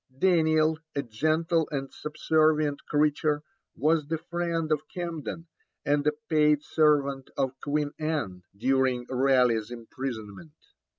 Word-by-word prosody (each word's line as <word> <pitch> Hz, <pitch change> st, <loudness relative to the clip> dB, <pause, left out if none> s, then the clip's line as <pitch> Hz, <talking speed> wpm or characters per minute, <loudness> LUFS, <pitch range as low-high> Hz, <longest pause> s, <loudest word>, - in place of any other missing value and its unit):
Daniel, 160 Hz, -2 st, +3 dB, 0.2 s
a 140 Hz, -, 0 dB
gentle 155 Hz, +7 st, 0 dB
and 135 Hz, -2 st, -4 dB
subservient 155 Hz, -1 st, +1 dB
creature, 150 Hz, 0 st, +1 dB, 0.3 s
was 155 Hz, -1 st, +1 dB
the 160 Hz, +1 st, -1 dB
friend 170 Hz, -1 st, -2 dB
of 150 Hz, -1 st, +2 dB
Camden, 165 Hz, -2 st, -5 dB, 0.4 s
and 145 Hz, 0 st, +1 dB
a -, -, +5 dB, 0.2 s
paid 150 Hz, -1 st, +3 dB
servant 140 Hz, -4 st, +2 dB
of 135 Hz, -2 st, +1 dB
Queen 145 Hz, 0 st, -1 dB
Anne, 150 Hz, -, -2 dB, 0.2 s
during 130 Hz, +1 st, +1 dB
Raleigh's 125 Hz, -4 st, +2 dB
imprisonment. 120 Hz, +2 st, -7 dB
150 Hz, 115 wpm, -27 LUFS, 135-155 Hz, 0.4 s, a